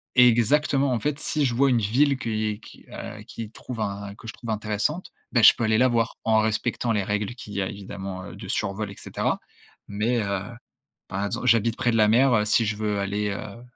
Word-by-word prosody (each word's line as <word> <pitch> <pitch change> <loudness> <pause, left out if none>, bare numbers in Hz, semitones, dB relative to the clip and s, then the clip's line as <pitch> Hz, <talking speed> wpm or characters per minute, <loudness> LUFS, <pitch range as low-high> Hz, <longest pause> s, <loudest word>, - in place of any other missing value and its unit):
Exactement, 130 +3 +4
en 115 - 0
fait 150 +2 -1
si 150 -1 +1
je 120 - -1
vois 135 +2 +3
une 120 - +3
ville 130 +6 +2
que 115 - -5
i 110 -1 -1
qui, - - -15
heu, 105 0 -8
qui 110 -1 -8
trouve 115 0 -8
un 100 0 -4
que 115 - -12
je - - -6
trouve 115 -2 -7
intéressante, 110 - -2 0.2
bah 120 - +4
je 105 - +9
peux 115 - -2
aller 110 0 +3
la 130 0 +5
voir 115 -1 0
en 110 -1 +4
respectant 115 +2 0
les 105 -2 +1
règles 105 +3 -2
qu'il 105 -4 -10
y 100 - 0
a 95 - -2
évidemment, 95 -1 -7
heu, - - -10
de - - -9
survol, 100 +1 -2
et 100 - -11
cetera. - - -2 0.5
Mais, 115 +4 0
heu, 100 -2 -1 0.7
par 100 +2 -2
exemple 125 +5 -3
j'habite 115 0 +4
près 120 - +1
de 115 - +1
la 105 -1 +5
mer, 125 +3 +4
heu, 105 -1 +3
si 110 +2 +3
je 105 0 -2
veux 105 -2 -1
aller, 100 +1 -1
heu, 105 +3 -7
110 Hz, 230 wpm, -25 LUFS, 105-120 Hz, 0.7 s, je